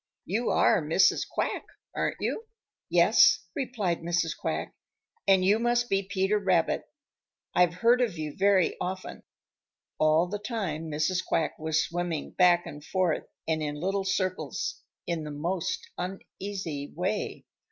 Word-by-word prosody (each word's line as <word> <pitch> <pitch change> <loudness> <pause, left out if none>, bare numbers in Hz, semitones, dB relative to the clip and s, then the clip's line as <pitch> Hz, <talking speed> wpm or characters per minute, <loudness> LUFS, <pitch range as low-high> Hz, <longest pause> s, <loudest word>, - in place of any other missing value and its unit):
You 220 +7 -1
are 215 -6 +4
Mrs. 160 +5 +3
Quack, - - -2 0.3
aren't - - 0
you?" 450 - -2 0.4
"Yes," - - +5
replied 225 - -1
Mrs. 170 -1 0
Quack, 80 +1 -3 0.5
"and 190 -1 +5
you 205 +3 +4
must 240 +1 +1
be 195 0 +3
Peter 195 +2 +1
Rabbit. 185 -4 +1 0.7
I've 175 -1 +3
heard 235 +6 +4
of 220 -9 0
you 155 -2 -4
very 195 -2 +3
often." 185 +1 -4 0.8
All 155 +2 +4
the 205 +3 -4
time 195 -8 -3
Mrs. 155 +5 0
Quack 165 - 0
was 160 0 +1
swimming 170 -3 -3
back 175 -1 +4
and 145 0 -9
forth 180 +1 0 0.2
and 160 -1 0
in 150 -1 -2
little 195 +6 -1
circles 185 -1 -2 0.2
in 170 -2 -2
the 150 - -6
most 175 +5 -2
uneasy 185 -4 -5
way. 190 +5 -2
180 Hz, 140 wpm, -28 LUFS, 160-195 Hz, 0.8 s, Yes